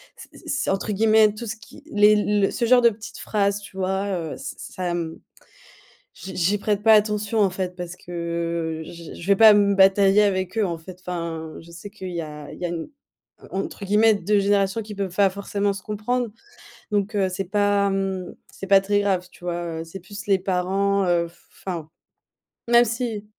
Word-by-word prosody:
c - - -13 0.2
c'est, 275 - -1
entre 195 +2 -1
guillemets, 215 0 +4
tout 215 +3 -7
ce 215 0 -5
qui 290 - -15
les 210 -2 +6
le 205 -1 +2
ce 240 - -3
genre 245 +1 +5
de 235 - +6
petites 215 0 -10
phrases, 200 -1 0
tu 200 -1 -13
vois, 190 +1 -1
heu, 170 -6 -3
ç - - -7
ça, 180 -1 -4
mmh, 165 -2 -4 0.9
j'y 190 - -9
j'y 185 +4 +1
prête 205 0 -1
pas 220 +1 +6
attention, 210 0 +2
en 200 - +5
fait, 180 -1 -4
parce 180 -1 -6
que 170 -2 -3
j 170 0 -10
j - - -11
je - - -7
vais 200 0 +4
pas 220 0 +8
me 200 -1 +3
batailler 195 +1 +5
avec 190 0 0
eux, 215 - +3
en 170 -2 -3
fait. 175 +3 -12
Enfin, 165 -3 -5
je 165 - -15
sais 170 +4 -9
qu'il 195 -3 -8
y 170 -1 -3
a 150 -2 -8
il - - -11
y 180 - -2
a - - -3
une 170 - -5 0.6
entre 195 +1 -4
guillemets, 210 +3 +4
«2 205 +1 +1
générations» 200 +1 +1
qui 210 -1 -8
peuvent 195 -3 -3
pas 195 +1 +4
forcément 200 +1 -2
se 195 - -9
comprendre, 230 +3 -2 0.6
donc 205 +1 0
heu, 195 -2 +2
c'est 185 +1 -3
pas, 205 +1 +2
mmh, 195 -2 -2 0.2
c'est 195 - -8
pas 195 0 +6
très 205 +1 +1
grave, 190 -3 0
tu - - -17
vois? 170 -2 -3
Heu, - - -8
c'est 165 +4 -9
plus 205 +5 -10
les 195 -2 +3
parents, 195 +2 +1
heu, 170 -1 +1
f 170 - -24 0.2
enfin, 170 -5 -4 0.8
même 240 0 +6
si 230 -2 -3
195 Hz, 210 wpm, -23 LUFS, 180-210 Hz, 0.9 s, pas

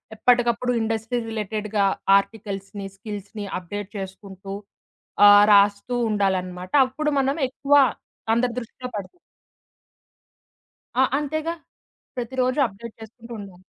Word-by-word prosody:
ఎప్పటికప్పుడు 245 +1 +2
ఇండస్ట్రీ 225 +2 -1
రిలేటెడ్‌గా 215 -1 -1 0.3
ఆర్టికల్స్‌ని, 200 -1 -5
స్కిల్స్‌ని 205 0 -7
అప్డేట్ 195 +3 -6
చేసుకుంటూ, 195 0 -8 0.7
ఆహ్, 205 0 +9
రాస్తూ 205 +4 +3
ఉండాలన్నమాట. 185 -3 -1 0.2
అప్పుడు 300 +4 -2
మనం 270 +1 +1
ఎక్కువ 280 +2 -1 0.6
అందరి 235 +1 +1
దృష్టిలో 250 +1 -8
పడతాం. 205 - -8 1.8
ఆ! - - +7
అంతేగా. 310 +3 -2 0.6
ప్రతిరోజు 255 +2 -1
అప్డేట్ 220 +2 -11
చేసుకుంటూ 230 +2 -11
ఉండాలి. 190 -2 -12
215 Hz, 95 wpm, -23 LUFS, 200-245 Hz, 1.8 s, ఆహ్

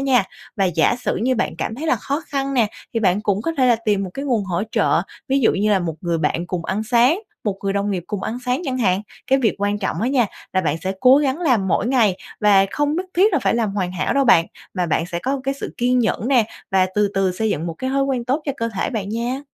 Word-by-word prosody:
nha. 260 -7 +3 0.3
Và 195 - +2
giả 175 +4 +2
sử 250 - -2
như 255 +3 +1
bạn - - -2
cảm 220 - -3
thấy 310 +6 -5
là 315 - +3
khó 285 +4 -3
khăn 275 -1 -2
nè, 235 -4 +4 0.3
thì 230 - +1
bạn 195 -1 +2
cũng 205 0 0
có 330 - -1
thể 255 - +4
là 240 - +4
tìm 210 -3 0
một 185 - -6
cái 275 - -4
nguồn 235 -7 0
hỗ 180 0 -1
trợ, - - +2 0.3
ví 270 +1 +2
dụ 235 - +4
như 210 +2 +1
là 200 - +4
một 170 -4 -3
người 170 -2 -1
bạn 165 +3 -1
cùng 180 -2 -4
ăn 200 +5 -1
sáng, 245 - +3 0.3
một 200 -2 -1
người 195 - +1
đồng 200 +1 -1
nghiệp 180 -3 -2
cùng 205 -2 -4
ăn 235 - -3
sáng 250 +7 0
chẳng 255 -3 -2
hạn. 195 -4 +1 0.2
Cái 270 - +3
việc 235 -5 +1
quan 205 +1 0
trọng 190 -4 -2
á 235 - +1
nha 255 -4 +2 0.3
là 185 - +2
bạn 155 -3 0
sẽ 190 +3 -3
cố 260 +2 +7
gắng 285 0 +1
làm 245 - +2
mỗi 220 - +1
ngày 225 -8 +3 0.2
và 200 -2 +5
không 295 +1 0
nhất 370 +1 -2
thiết 385 +3 +4
là - - +3
phải - - +1
làm 225 -4 0
hoàn 185 -3 -1
hảo 185 - -1
đâu 275 -1 +3
bạn, 165 -8 +5 0.3
mà 180 -2 0
bạn 160 +1 0
sẽ 170 -1 -4
có 270 +6 -2
cái 275 0 0
sự - - -7
kiên 250 +1 +2
nhẫn 230 0 0
nè 250 -5 +4 0.3
và 190 -1 +3
từ 210 -1 +2
từ 195 -2 +1
xây 220 +4 -1
dựng 165 -1 -2
một 165 - -4
cái 260 - -2
thói 275 +1 +1
quen 255 -3 -1
tốt 275 +5 0
cho 280 - -1
cơ 230 -3 -1
thể - - -1
bạn 205 -4 -3
nha. 235 +4 -2
220 Hz, 285 wpm, -21 LUFS, 190-260 Hz, 0.3 s, cố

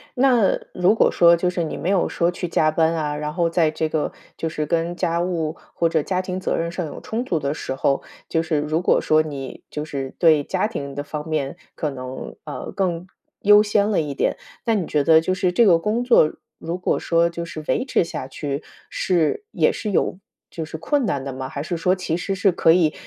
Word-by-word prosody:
那 245 -6 +4 0.2
如 180 +4 +3
果 - - +4
说 170 0 +6
就 180 +1 0
是 180 -1 -1
你 160 - -4
没 175 - -3
有 195 -2 +2
说 170 +1 +1
去 175 0 -4
加 155 -2 +2
班 160 +1 +2
啊， 150 -2 -1
然 150 0 -3
后 170 -1 +1
在 165 -2 +2
这 160 0 -2
个 155 -1 0 0.3
就 165 - -2
是 155 -1 -2
跟 170 +3 -1
家 170 -1 0
务 170 -3 -2 0.2
或 170 - +1
者 160 -1 +1
家 185 +4 -1
庭 185 0 -4
责 - - -1
任 170 0 -2
上 175 0 -3
有 150 - -8
冲 230 +3 -3
突 170 - 0
的 140 -1 -1
时 135 - -4
候， 135 +1 +1 0.3
就 160 - +1
是 160 -2 0
如 155 +3 0
果 - - +3
说 155 0 +4
你 140 -4 -6
就 150 - -4
是 135 -3 -5
对 155 -4 +4
家 190 +1 0
庭 140 -11 -5
的 145 - -3
方 150 +1 -6
面 150 -4 -2 0.2
可 155 - -2
能， 130 -1 -7
呃， - - -6
更 180 -3 -1 0.4
优 210 +1 +7
先 210 0 +2
了 200 - +2
一 150 -2 -2
点。 - - 0 0.3
那 230 -2 +2
你 190 -6 -1
觉 150 -2 +1
得 160 +2 +6
就 175 +3 -1
是 185 -1 +1
这 230 +6 +4
个 175 -5 +6
工 215 +8 -1
作 195 -11 +5 0.3
如 170 +2 -4
果 180 - 0
说 170 0 +2
就 170 0 -5
是 160 -2 -7
维 - - +1
持 255 -9 +1
下 135 -5 -6
去， 140 +1 -4 0.3
是 175 - 0
也 - - +2
是 215 - -4
有 185 - +1 0.3
就 165 - -5
是 160 0 -7
困 250 - 0
难 140 -8 -1
的 135 - -5
吗？ 130 0 -5
还 140 - -5
是 175 - -3
说 180 +2 +2
其 185 -4 -2
实 195 +3 -2
是 195 0 +3
可 165 - +4
以 165 -3 +3
165 Hz, 250 characters per minute, -22 LUFS, 155-185 Hz, 0.4 s, 优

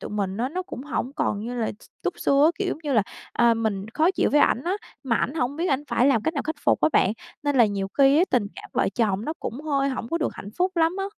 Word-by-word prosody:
tụi - - -7
mình 200 -2 -2
á, 245 +3 -1
nó 365 +5 -3
cũng 315 -9 -8
hổng 280 -2 -3
còn 205 -8 0
như 240 +3 -5
là 230 -3 -1
x - - -16 0.2
túc - - -2
xưa 280 +1 +4
á, 320 - +6
kiểu, 395 -2 -1
giống 315 - -2
như 290 -2 -2
là, 220 -5 +4 0.3
à, 235 -1 +4
mình 215 -3 -2
khó 320 +4 +4
chịu - - +1
với 295 - +4
ảnh 245 - +3
á, 360 - 0 0.3
mà 235 -4 +1
ảnh 270 - -1
hổng 280 -1 -1
biết 345 +3 -1
ảnh 270 -2 +1
phải 240 +1 +3
làm 230 -6 +3
cách 320 - -1
nào 280 - -1
khắc 315 +1 -3
phục - - +3
á - - +4
bạn, 195 - +3 0.3
nên 290 -2 0
là 235 -3 +6
nhiều 195 -1 -2
khi 275 +1 +6
á 355 - +5
tình 230 -5 +2
cảm - - -11
vợ - - +1
chồng 215 -2 0
nó 310 - -2
cũng 250 +5 -5
hơi 275 -3 +1
hổng 255 -3 -4
có 335 - -1
được 310 - 0
hạnh 200 - -8
phúc 365 0 +1
lắm 325 +1 +3
á. 390 - -1
270 Hz, 300 wpm, -24 LUFS, 225-310 Hz, 0.3 s, á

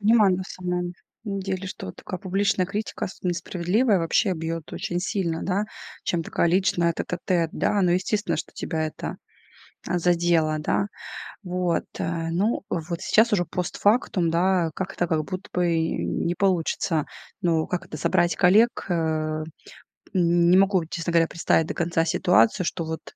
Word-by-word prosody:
На 205 -4 +4
самом 180 -1 -3 0.3
деле, 195 -2 -3
что 95 - -6
такая 185 - -7
публичная 195 -1 +1
критика, 205 +2 -3
особенно 180 -1 -3
несправедливая, 185 +5 +1
вообще 180 +4 +2
бьёт 165 0 -5
очень 175 0 -2
сильно, 180 -3 -1
да, 195 +2 0 0.4
чем 170 -2 0
такая 170 - 0
личная 175 -2 +2
тет-а-тет, 175 -1 -1
да. 205 - +1
Ну, 180 - +3
естественно, 185 -1 0
что - - -5
тебя 160 -1 -2
это, 155 - -6 0.7
а, 175 - 0
задело, 170 -3 +2
да? 195 +6 0 0.6
Вот, 180 -2 -1
э. 165 -1 -2
Ну, 200 +8 0
вот 170 0 -3
сейчас 225 +2 +3
уже 175 -4 +3
постфактум, 180 +1 +1
да, 175 -1 +2
как-то 185 -1 -2
как 155 -2 0
будто 185 +2 -6
бы 180 -1 +1
и 160 0 0
не 175 - -1
получится. 170 -4 +1 0.4
Ну, 165 -2 +2
как 180 - -3
это, - - -7
собрать 175 +2 +2
коллег, 210 +6 +4
э 155 -2 -1 0.7
не 175 0 +4
могу, 190 -3 +3
честно 165 +1 -4
говоря, 165 -1 +4
представить 165 -1 +1
до - - -3
конца 165 -1 0
ситуацию, 180 +3 +3
что 165 0 -2
вот 160 0 -4
175 Hz, 150 wpm, -25 LUFS, 165-190 Hz, 0.7 s, На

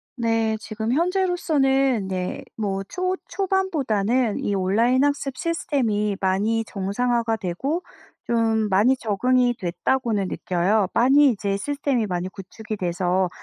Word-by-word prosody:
네. 225 -2 0
지금 220 +2 -4
현재로서는 290 - +1
네 185 -1 -3
뭐 195 -3 -2
초 370 0 -1
초반보다는 260 - 0
이 200 - 0
온라인 230 +8 +2
학습 285 -2 -1
시스템이 225 - -1
많이 205 +4 +1
정상화가 225 +4 -1
되고 265 - -2 0.4
좀 225 -2 +1
많이 210 +7 +4
적응이 245 +3 +1
됐다고는 205 +3 -1
느껴요. 185 +3 0
많이 275 +4 +5
이제 200 -3 -1
시스템이 275 -1 -1
많이 180 0 -3
구축이 210 +3 -8
돼서 180 0 0
225 Hz, 275 characters per minute, -23 LUFS, 195-265 Hz, 0.4 s, 많이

